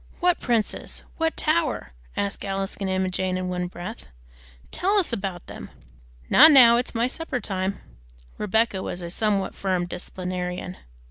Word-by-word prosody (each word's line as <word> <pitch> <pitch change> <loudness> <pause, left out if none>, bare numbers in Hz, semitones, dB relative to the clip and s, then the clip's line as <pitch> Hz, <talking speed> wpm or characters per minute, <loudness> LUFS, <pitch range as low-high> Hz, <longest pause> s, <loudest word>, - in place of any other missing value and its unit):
"What 355 -1 +2
princes? 230 -4 -1
What 325 0 0
tower?" 315 0 +1 0.3
asked 200 0 -2
Alice 195 0 -2
and 195 -1 -3
Emma 190 0 +1
Jane 185 0 -1
in 185 0 -3
one 180 0 -2
breath. 180 +5 -8 0.6
"Tell 395 +3 +1
us 360 -11 +1
about 190 -5 -4
them." - - -9 0.6
"Not 310 +4 +9
now, 240 -4 +8
it's 245 0 -2
my 230 +1 +2
supper 260 0 -3
time." 190 -3 -2 0.6
(Rebecca 210 -1 +1
was 175 -1 -5
a 170 - -5
somewhat 205 0 0
firm 185 -2 -1
disciplinarian.) 180 0 -5
195 Hz, 150 wpm, -25 LUFS, 185-245 Hz, 0.6 s, Not